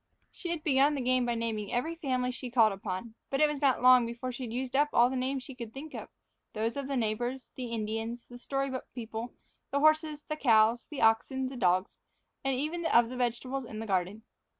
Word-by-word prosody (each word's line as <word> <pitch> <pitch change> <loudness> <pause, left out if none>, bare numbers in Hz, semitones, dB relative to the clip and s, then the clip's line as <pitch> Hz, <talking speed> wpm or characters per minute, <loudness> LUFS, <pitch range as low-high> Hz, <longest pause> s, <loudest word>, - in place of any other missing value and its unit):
She 350 - -7
had 335 -2 -3
begun 285 -1 +4
the 275 - -2
game 255 0 +2
by 240 - 0
naming 225 -3 -3
every 250 +7 -1
family 255 -6 -1
she 250 0 -7
called 225 -4 +4
upon. 195 +2 -5 0.2
But 270 - -1
it 305 - +6
was 295 -2 -4
not 265 -3 +2
long 250 -2 +7
before 235 +2 -4
she 245 - -8
had 225 - -7
used 255 +2 -3
up 295 +2 +4
all 240 +2 +5
the - - -2
names 260 +1 -1
she 270 - -9
could 235 -2 -8
think 300 +3 -8
of - - -7 0.4
those 225 +1 -1
of 280 -1 -3
the 275 -1 -1
neighbors, 240 +3 -2
the 255 -2 -4
Indians, 225 +1 -3
the 245 0 -12
story 275 +1 -2
book 260 - -5
people, 230 0 -6 0.3
the 280 - 0
horses, 310 0 +3
the 305 - -3
cows, 230 -3 +4
the 290 -6 -3
oxen, 255 +4 +2
the 265 - -8
dogs, 185 -3 +1 0.4
and 270 -1 0
even 310 +6 -2
the 240 -6 +3
vegetables 255 +2 -2
in 225 -3 -8
the 220 - -4
garden. 195 +2 -1
250 Hz, 220 wpm, -30 LUFS, 230-275 Hz, 0.4 s, long